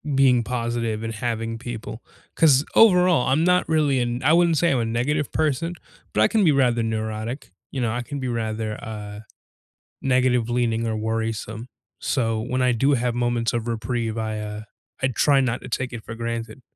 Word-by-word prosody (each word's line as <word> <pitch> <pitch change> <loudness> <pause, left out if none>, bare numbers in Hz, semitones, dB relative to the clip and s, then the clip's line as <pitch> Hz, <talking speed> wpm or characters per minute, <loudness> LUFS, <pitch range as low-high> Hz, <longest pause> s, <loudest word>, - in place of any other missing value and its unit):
being 125 -3 +4
positive 115 -2 -2
and 115 - -3
having 115 -1 -3
people, 115 -1 -7 0.3
'cause 145 -4 +5
overall, 180 - +5
I'm 150 +5 +2
not 180 0 +3
really 150 -5 +2
an 120 +1 -2
I 155 +4 +4
wouldn't 170 -2 +4
say 170 +1 +3
I'm 130 - +2
a 115 - 0
negative 130 +6 -1
person, 155 +2 0 0.4
but 105 - +2
I - - +6
can 220 -3 +2
be 155 - +5
rather 125 -4 +2
neurotic. 110 +1 -4 0.2
You 130 - -3
know, 115 - 0
I 120 +2 -2
can 145 +3 -6
be 130 - -3
rather, 110 -2 -3
uh, 105 -1 -7 0.8
negative 125 -3 +2
leaning 115 -1 0
or 110 - -1
worrisome. 110 +1 -3 0.3
So 115 -5 0
when 130 +3 -2
I 125 0 +3
do 135 +5 +2
have 120 -1 0
moments 120 -1 0
of 120 0 -2
reprieve, 115 -1 -2
I, 110 -1 -2
uh, 105 0 -5 0.4
I 130 - +3
try 135 +3 +3
not 125 -2 -1
to - - -9
take 125 +1 -3
it 115 - -7
for 115 - -7
granted. 115 +2 -5
120 Hz, 190 wpm, -23 LUFS, 115-135 Hz, 0.8 s, I